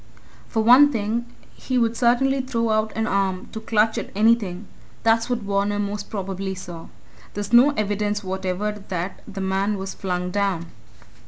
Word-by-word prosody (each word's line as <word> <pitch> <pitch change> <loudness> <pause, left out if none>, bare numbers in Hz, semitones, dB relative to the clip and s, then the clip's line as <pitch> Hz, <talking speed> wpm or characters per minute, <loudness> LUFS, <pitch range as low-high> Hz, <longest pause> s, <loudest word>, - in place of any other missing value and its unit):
For 220 -2 0
one 260 +6 +7
thing, 230 0 -2 0.3
he 255 - -3
would 230 -1 +2
certainly 265 +3 +2
throw 230 -3 -1
out 215 0 +1
an 225 - 0
arm 190 -2 -1
to 220 - -5
clutch 220 0 +1
at - - -6
anything. 210 -4 +2 0.4
That's 225 +1 +3
what 240 -3 -1
Varner 200 +1 0
most 205 0 -3
probably 195 -1 -4
saw. 175 -3 -9 0.5
There's 205 +2 -4
no 245 +4 +8
evidence 205 0 -1
whatever 190 +2 -2 0.2
that 180 +1 -4
the 195 - -6
man 195 +2 0
was 190 0 -5
flung 180 -1 -3
down." 190 -4 -1
205 Hz, 160 wpm, -23 LUFS, 190-230 Hz, 0.5 s, no